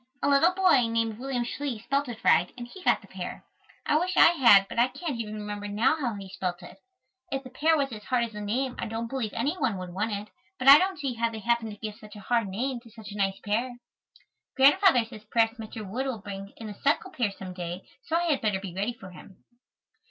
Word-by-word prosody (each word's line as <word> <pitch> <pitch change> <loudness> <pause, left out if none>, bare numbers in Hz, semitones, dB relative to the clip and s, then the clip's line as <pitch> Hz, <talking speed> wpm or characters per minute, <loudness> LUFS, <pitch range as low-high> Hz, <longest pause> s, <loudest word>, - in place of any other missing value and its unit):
A - - +3
little 285 +6 +5
boy, 330 -11 +4
named 230 -1 -1
William 255 -2 -2
Schley, 265 0 -4
spelt 275 +5 -1
it 230 -2 -8
right 175 - +4
and 240 -1 -7
he 380 +9 -12
got - - +2
the - - -16
pear. - - -7 0.4
I 300 - +3
wish 365 +2 -2
I - - +9
had, 230 - +6
but - - -4
I 240 - +5
can't 275 0 -5
even 215 -2 -4
remember 205 -1 -5
now 210 +8 +2
how 255 -8 -2
he 195 -1 -8
spelt 185 -1 -4
it. 175 - -12 0.5
If 270 0 -2
the 255 - -11
pear 315 +5 +2
was 275 -2 0
as 210 -1 -9
hard 250 -2 +1
as 230 - -4
the 210 -1 -7
name 245 +5 -1
I - - -2
don't 225 +1 -4
believe 250 -6 -2
any 300 +5 -1
one 235 -8 0
would 180 -1 -7
want 210 +4 -1
it, 205 +1 -4 0.3
but 255 - -3
I 280 +2 +11
don't 380 -1 0
see 275 -4 -2
how 230 0 0
they 225 - -7
happened 235 +1 0
to - - -12
give 215 0 -6
such 215 -1 -13
a - - -9
hard 230 0 0
name 240 +6 -2
to 235 -1 -17
such 215 -2 -11
a - - -8
nice 195 -1 0
pear. 235 +4 -1 0.8
Grandfather 275 - +6
says 220 -2 -12
perhaps 230 0 +2
Mr. 220 -1 -7
Wood 255 +8 -3
will 260 -3 -2
bring 200 -1 -8
in 225 - -8
a 210 - -6
Seckle 295 +6 +1
pear 235 -5 0
some 190 -2 -8
day, 180 0 -6 0.2
so 325 - -2
I 340 - +2
had 310 -6 +1
better 210 -3 0
be 190 -3 -7
ready 200 +6 -2
for 190 -5 -12
him. 180 +1 -15
230 Hz, 250 wpm, -27 LUFS, 205-270 Hz, 0.8 s, I